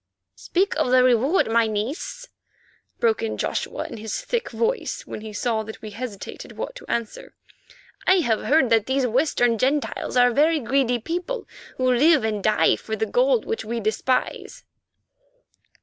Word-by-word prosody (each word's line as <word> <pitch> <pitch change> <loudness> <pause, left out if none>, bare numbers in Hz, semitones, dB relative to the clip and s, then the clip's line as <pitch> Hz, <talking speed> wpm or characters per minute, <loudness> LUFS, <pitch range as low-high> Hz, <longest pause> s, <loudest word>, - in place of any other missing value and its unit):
"Speak 385 +3 -1
of - - +1
the 255 0 +5
reward, 255 +8 +3
my 230 0 +3
niece," 295 - -4 0.7
broke 450 -2 +2
in 455 - -3
Joshua - - -2
in - - -8
his 220 -1 -4
thick 475 -1 -2
voice 475 +2 -2
when - - -7
he 220 0 -8
saw 220 +1 -1
that 220 0 -9
we 215 - -7
hesitated 215 -2 -7
what - - -4
to - - -13
answer, 235 -2 -4 0.7
"I 375 - +6
have 225 -8 0
heard 275 -4 +3
that 225 -2 +3
these 265 0 +1
Western 245 -2 +1
Gentiles 270 0 -1
are 245 0 +5
a - - -5
very 310 +4 +3
greedy 250 -1 +1
people, 355 - -4 0.3
who 255 -1 +2
live 295 +2 +4
and 215 -2 -2
die 215 - +3
for 220 - -5
the 220 +1 -1
gold - - +2
which 450 - -3
we 230 +2 -3
despise." 220 +4 -2
255 Hz, 165 wpm, -23 LUFS, 220-330 Hz, 0.7 s, I